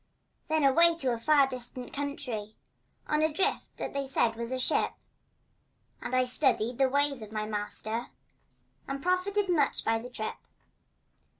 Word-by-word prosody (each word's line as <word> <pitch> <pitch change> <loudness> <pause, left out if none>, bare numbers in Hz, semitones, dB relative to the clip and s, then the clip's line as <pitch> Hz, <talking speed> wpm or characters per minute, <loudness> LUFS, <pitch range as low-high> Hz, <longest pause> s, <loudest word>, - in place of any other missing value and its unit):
Then 315 -1 +1
away 335 +5 +6
to 265 -7 0
a 230 - -4
far 285 +3 +5
distant 250 -1 -5
country 265 -7 -4 0.5
On 300 0 +1
a 315 0 +2
drift 325 +6 -1
that - - -4
they 280 -1 -2
said 235 -4 +1
was 235 +1 -5
a 260 - -1
ship, 255 - +1 1.1
And 255 - -3
I 255 0 +3
studied 250 -2 +1
the 265 -1 +4
ways 285 -1 +1
of 215 -1 -9
my 215 -1 -2
master 215 +2 -3 0.8
And 275 0 -4
profited 380 +3 +1
much 310 -6 +1
by 225 0 +2
the 245 +2 -8
trip. 220 -3 -4
260 Hz, 160 wpm, -29 LUFS, 235-295 Hz, 1.1 s, away